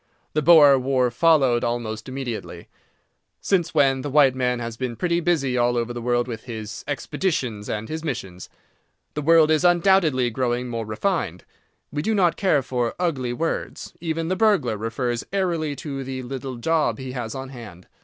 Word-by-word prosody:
The 155 - +1
Boer 150 -4 +7
war 130 -1 +1
followed 135 -5 +3
almost 120 -1 -3
immediately. 130 -4 -6 0.7
Since 175 -4 0
when 135 -3 +3
the 145 - -4
white 140 -2 +5
man 125 -1 0
has 115 -1 -5
been 125 0 -4
pretty 170 +5 0
busy 145 -8 +1
all 120 0 +2
over 120 0 -2
the 120 - -5
world 120 0 0
with 115 -2 -7
his 110 -3 -7
"expeditions" 135 - -2
and 110 +1 -3
his 160 0 -5
"missions." 125 - -5 0.6
The 150 - -3
world 160 +1 +5
is 155 +2 +2
undoubtedly 175 -8 +3
growing 125 0 -1
more 115 -2 -4
refined. 110 - -2 0.5
We 145 +1 -2
do 220 +7 0
not 175 -4 +3
care 170 -8 +2
for 125 -2 -2
ugly 140 -9 -1
words. 165 +7 -4
Even 165 -1 -2
the 185 - 0
burglar 190 - +2
refers 115 +2 -2
airily 170 -6 -1
to 140 -2 -5
the 130 0 -5
"little 130 0 -6
job" 155 +6 0
he 130 -1 -6
has 120 -3 -5
on 135 0 -6
hand. 110 -9 -11
130 Hz, 175 wpm, -23 LUFS, 120-160 Hz, 0.7 s, Boer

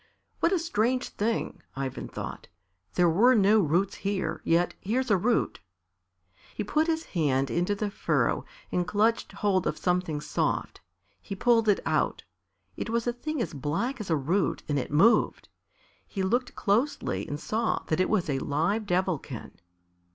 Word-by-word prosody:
"What 335 - +3
a 380 - +3
strange 255 -6 0
thing!" 225 +2 -2
Ivan 135 -1 -4
thought. - - -7 0.5
"There 180 -1 +4
were 225 +10 +5
no 210 +1 +5
roots 180 +2 +1
here, 195 -1 -2
yet 170 +2 +2
here's 245 +4 0
a - - +6
root!" 230 +6 +1 1.0
He 210 - -2
put 305 +10 +1
his 325 -1 0
hand 135 -6 0
into 180 +4 +1
the 205 0 -2
furrow - - +1 0.3
and 180 0 0
clutched 220 +4 +1
hold 190 -4 +1
of - - -1
something 180 -4 0
soft. 150 - -2 0.4
He 200 - -6
pulled 225 +1 +3
it 205 - +3
out. - - 0 0.5
It - - -4
was 230 0 0
a 240 - 0
thing 300 +2 -2
as - - -6
black 215 - -2
as 205 - -7
a 160 - +3
root 165 +5 0
and 145 -2 +1
it - - -4
moved. 200 +11 +3 0.6
He 195 - -3
looked 245 +7 0
closely 230 +8 0
and 145 - -4
saw 220 +6 -1
that 155 - -1
it 185 - +2
was 210 -5 +1
a 135 -3 0
live 170 +11 0
Devilkin. 180 -4 -2
200 Hz, 165 wpm, -28 LUFS, 170-230 Hz, 1.0 s, a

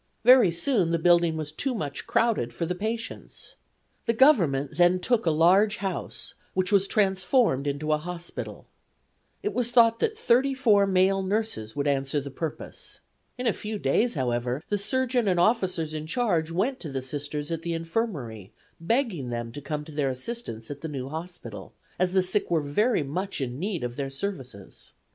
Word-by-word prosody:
Very 245 -4 +7
soon 175 +2 +2
the 170 - +2
building 170 -1 +3
was 155 -1 -4
too 255 - -2
much 145 -9 -5
crowded 220 - +1
for 145 +8 -3
the 180 - -1
patients. 225 +4 -5 0.5
The 230 - +3
Government 165 - +4
then 175 +1 +4
took 230 0 +1
a - - +6
large 185 +7 +4
house, 195 -3 -5 0.2
which 185 -1 0
was 200 -1 +4
transformed 190 - +2
into 145 +2 -2
a 150 - +2
hospital. 175 +1 -6 0.8
It 415 - -1
was 245 -1 0
thought 230 -2 +5
that 440 -1 -1 0.7
male 190 +1 +3
nurses 190 - -2
would 145 0 -1
answer 135 +1 0
the 140 0 -7
purpose. 155 +2 -6 0.4
In 250 - -4
a 230 - +3
few 215 0 -5
days, 205 - +1
however, 125 +1 -1
the 205 - +1
surgeon 250 +1 +1
and 180 -2 +2
officers 180 -6 +1
in 155 0 -5
charge 175 -7 0
went 210 +11 -1
to 160 - -6
the 135 -2 -4
Sisters 145 +2 -4
at 165 -1 -2
the 170 0 -2
Infirmary, 165 - -4 0.3
begging 180 - 0
them 120 -1 -4
to 145 - -8
come 150 +1 -4
to 160 - -10
their 145 -2 0
assistance 130 - -5
at 145 0 -7
the 160 - -4
new 135 -2 -5
hospital, 170 +4 -8 0.3
as 180 0 +1
the 190 -1 +4
sick 195 +3 0
were 165 -2 +2
very 165 - +1
much 180 +8 -4
in 130 -1 -4
need 185 -3 -2
of 120 0 -4
their 140 -1 -2
services. 135 - -7
170 Hz, 175 wpm, -26 LUFS, 145-210 Hz, 0.8 s, Very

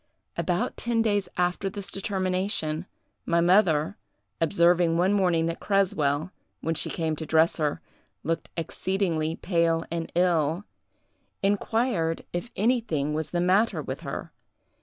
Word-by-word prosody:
About - - -1
ten 235 -1 +1
days 205 -4 +1
after 180 +2 0
this 195 0 -7
determination, 185 -4 -1 0.4
my 170 0 +2
mother, 175 -2 +3 0.4
observing 170 0 +3
one 185 +3 +3
morning 180 -5 +2
that 165 0 -2
Creswell, 170 -5 +1 0.3
when 165 - -1
she - - -1
came 160 -2 -1
to 160 - -4
dress 160 +1 +3
her, 150 -3 -1 0.4
looked 165 +1 -2
exceedingly 165 -2 -1
pale 170 -2 +1
and 165 -1 -3
ill, 170 0 +2 0.8
inquired 200 -4 0
if 175 +7 -3
anything 200 - +1
was 155 0 -2
the 175 - -1
matter 190 +6 +3
with - - -4
her. - - -6
175 Hz, 130 wpm, -26 LUFS, 165-195 Hz, 0.8 s, mother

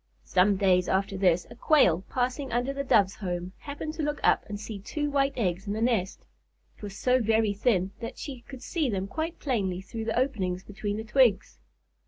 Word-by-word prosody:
Some 195 +2 +3
days 180 -2 +3
after 195 +1 0
this, 180 -2 +2
a - - -9
Quail, 210 - +4
passing 255 +2 -1
under 245 +3 0
the 280 0 -3
Doves' 200 -7 +3
home, 180 -2 -4
happened 290 +2 -6
to 320 - -4
look 295 0 -1
up - - +4
and 205 0 -5
see 210 -1 -6
two 295 +9 -3
white 275 0 +2
eggs 195 -3 -1
in 200 - -1
the 215 - -3
nest. 225 -5 0 0.5
It - - -22
was 205 -1 -7
so 255 0 +2
very 220 -1 +2
thin 195 -3 +1
that 230 - -6
she 265 -4 -7
could 260 0 -11
see 315 -7 -1
them 195 -3 -1
quite 320 +9 -4
plainly 200 -10 -1
through 220 +4 -6
the 225 - -1
openings 190 -9 0
between 205 +1 -4
the 220 - -4
twigs. 225 -2 +2
220 Hz, 205 wpm, -28 LUFS, 190-260 Hz, 0.5 s, Quail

